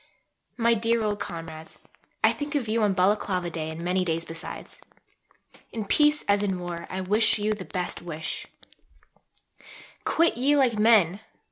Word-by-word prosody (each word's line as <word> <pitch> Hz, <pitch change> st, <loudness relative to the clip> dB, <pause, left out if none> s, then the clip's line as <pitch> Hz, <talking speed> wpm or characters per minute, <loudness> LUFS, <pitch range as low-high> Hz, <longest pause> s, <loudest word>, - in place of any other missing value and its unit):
MY 235 Hz, -1 st, +4 dB
DEAR 230 Hz, 0 st, +1 dB
OLD 205 Hz, -1 st, -1 dB
COMRADES 160 Hz, -1 st, -7 dB, 0.5 s
I -, -, +5 dB
think 295 Hz, 0 st, -5 dB
of 265 Hz, -6 st, 0 dB
you 225 Hz, +1 st, +1 dB
on 205 Hz, -2 st, +2 dB
Balaclava 185 Hz, -2 st, +1 dB
Day 160 Hz, -1 st, -3 dB
and 160 Hz, +1 st, -6 dB
many 180 Hz, +1 st, +1 dB
days 165 Hz, -1 st, -1 dB
besides. 165 Hz, -, -8 dB, 0.9 s
In 220 Hz, -2 st, -4 dB
peace 295 Hz, +7 st, +3 dB
as 200 Hz, 0 st, +3 dB
in 195 Hz, -3 st, 0 dB
war, 175 Hz, -1 st, -6 dB
I 190 Hz, -, -3 dB
wish 210 Hz, +5 st, +3 dB
you 210 Hz, +1 st, 0 dB
the 200 Hz, -3 st, -7 dB
best 180 Hz, -2 st, -3 dB
wish: 160 Hz, -2 st, -5 dB, 1.6 s
Quit 335 Hz, -6 st, +2 dB
ye 275 Hz, +4 st, +3 dB
like 265 Hz, -4 st, +3 dB
men! 210 Hz, -5 st, +5 dB
205 Hz, 155 wpm, -26 LUFS, 175-230 Hz, 1.6 s, I